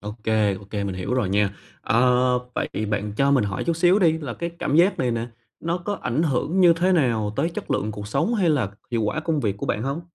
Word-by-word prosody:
ô 105 Hz, 0 st, -6 dB
kê, 110 Hz, -3 st, +2 dB
ô 95 Hz, +1 st, -10 dB
kê, 100 Hz, 0 st, -4 dB
mình 95 Hz, -, -3 dB
hiểu 95 Hz, +7 st, -3 dB
rồi 120 Hz, -7 st, 0 dB
nha. 100 Hz, 0 st, +1 dB, 0.2 s
Ờ, 125 Hz, +2 st, +3 dB, 0.2 s
vậy -, -, -1 dB, 0.2 s
bạn 105 Hz, 0 st, -2 dB
cho 140 Hz, 0 st, +3 dB
mình 135 Hz, -5 st, +3 dB
hỏi 95 Hz, -2 st, -3 dB
chút 170 Hz, -1 st, 0 dB
xíu 180 Hz, +4 st, +4 dB
đi, 160 Hz, -4 st, +3 dB
là 135 Hz, -7 st, -5 dB
cái 170 Hz, 0 st, -4 dB
cảm 145 Hz, -, 0 dB
giác 180 Hz, +4 st, +4 dB
này 125 Hz, -2 st, +1 dB
nè, 115 Hz, +1 st, -2 dB, 0.3 s
nó 170 Hz, +2 st, -1 dB
có 205 Hz, +4 st, -3 dB
ảnh 130 Hz, +7 st, 0 dB
hưởng 160 Hz, +5 st, 0 dB
như 175 Hz, -2 st, +7 dB
thế 180 Hz, +3 st, +1 dB
nào 115 Hz, -10 st, +1 dB
tới 155 Hz, +5 st, +1 dB
chất -, -, -7 dB
lượng 110 Hz, +1 st, -1 dB
cuộc 105 Hz, 0 st, -7 dB
sống 165 Hz, -, 0 dB
hay 185 Hz, -6 st, +2 dB
là 125 Hz, -10 st, +1 dB, 0.2 s
hiệu 115 Hz, -2 st, 0 dB
quả 130 Hz, +9 st, -1 dB
công 155 Hz, -2 st, -1 dB
việc 100 Hz, -4 st, -1 dB
của -, -, -5 dB
bạn 105 Hz, -, -1 dB
hông? 140 Hz, +4 st, -2 dB
125 Hz, 260 wpm, -23 LUFS, 105-165 Hz, 0.3 s, như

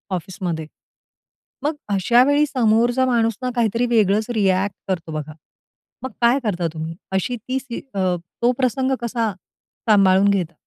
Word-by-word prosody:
ऑफिसमध्ये." 175 Hz, -3 st, -4 dB, 1.0 s
मग 300 Hz, +2 st, 0 dB, 0.2 s
अशावेळी 250 Hz, +9 st, +4 dB
समोरचा 240 Hz, 0 st, +2 dB
माणूस 230 Hz, -3 st, +2 dB
ना 255 Hz, -, -1 dB
काहीतरी 235 Hz, 0 st, +1 dB
वेगळंच 215 Hz, -1 st, +2 dB
रिॲक्ट 195 Hz, -1 st, +1 dB
करतो 170 Hz, -3 st, -2 dB
बघा. 155 Hz, 0 st, -5 dB, 0.7 s
मग 260 Hz, -, -3 dB
काय 240 Hz, +3 st, +4 dB
करता 180 Hz, -6 st, -1 dB
तुम्ही? 160 Hz, +1 st, -5 dB, 0.2 s
अशी 190 Hz, +6 st, -1 dB
ती 255 Hz, +4 st, -3 dB
स्थि 245 Hz, -3 st, -7 dB
अ, 185 Hz, -2 st, +1 dB, 0.3 s
तो 240 Hz, +1 st, +4 dB
प्रसंग 260 Hz, +1 st, +1 dB
कसा 235 Hz, -2 st, -1 dB, 0.6 s
सांभाळून 195 Hz, -1 st, +5 dB
घेता? 180 Hz, -4 st, 0 dB
220 Hz, 135 wpm, -21 LUFS, 185-245 Hz, 1.0 s, सांभाळून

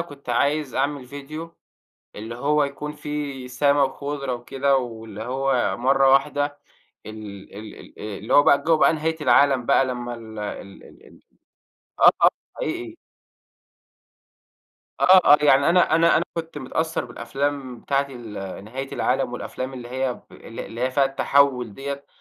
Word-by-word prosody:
كنت 145 Hz, -6 st, -9 dB
عايز 140 Hz, +2 st, 0 dB
أعمل 140 Hz, -1 st, -1 dB
فيديو 155 Hz, +5 st, -8 dB, 0.6 s
اللي 110 Hz, +3 st, -7 dB
هو 145 Hz, +3 st, +2 dB
يكون 140 Hz, +1 st, -5 dB
فيه 145 Hz, -3 st, -5 dB
سما 140 Hz, +3 st, +2 dB
وخُضرة 140 Hz, -1 st, -3 dB
وكده 135 Hz, +3 st, 0 dB
واللي 110 Hz, -4 st, -6 dB
هو 130 Hz, 0 st, 0 dB
مَرّة 135 Hz, +2 st, +3 dB
واحدة 145 Hz, +1 st, +1 dB, 0.5 s
ال 105 Hz, -3 st, -10 dB
ال 105 Hz, 0 st, -9 dB
ال -, -, -15 dB
اللي 105 Hz, +3 st, -5 dB
هو 145 Hz, -, +7 dB
بقى 140 Hz, -, +4 dB
جو 165 Hz, 0 st, +3 dB
بقى 155 Hz, -, +4 dB
نهاية 160 Hz, +1 st, -2 dB
العالَم 140 Hz, -4 st, +4 dB
بقى 135 Hz, -, +4 dB
لمّا 120 Hz, -1 st, -4 dB
ال 110 Hz, -2 st, -10 dB
ال 100 Hz, -1 st, -7 dB
ال -, -, -17 dB
ال -, -, -18 dB, 0.8 s
آه، -, -, +9 dB
آه -, -, +9 dB, 0.3 s
حقيقي. 355 Hz, -7 st, -4 dB, 2.0 s
آه، -, -, +3 dB, 0.3 s
آه، -, -, +4 dB
يعني 140 Hz, +1 st, +5 dB
أنا 175 Hz, -2 st, +4 dB
أنا 165 Hz, 0 st, +4 dB
أنا -, -, +1 dB
كنت 165 Hz, -2 st, -5 dB
متأثّر 160 Hz, +4 st, -2 dB
بالأفلام 130 Hz, +1 st, -4 dB
بتاعة 140 Hz, 0 st, 0 dB
ال 105 Hz, -6 st, -8 dB
نهاية 135 Hz, +5 st, -6 dB
العالم 130 Hz, -1 st, 0 dB
والأفلام 130 Hz, +1 st, -5 dB
اللي 120 Hz, -2 st, -8 dB
هي 130 Hz, 0 st, -2 dB
ب -, -, -20 dB
اللي 115 Hz, -, -9 dB
اللي 115 Hz, -, -8 dB
هي 130 Hz, +1 st, +1 dB
فيها 135 Hz, +1 st, +3 dB
التحوُّل 135 Hz, -4 st, +2 dB
ديّة، 140 Hz, +2 st, -6 dB
135 Hz, 155 wpm, -23 LUFS, 120-145 Hz, 2.0 s, آه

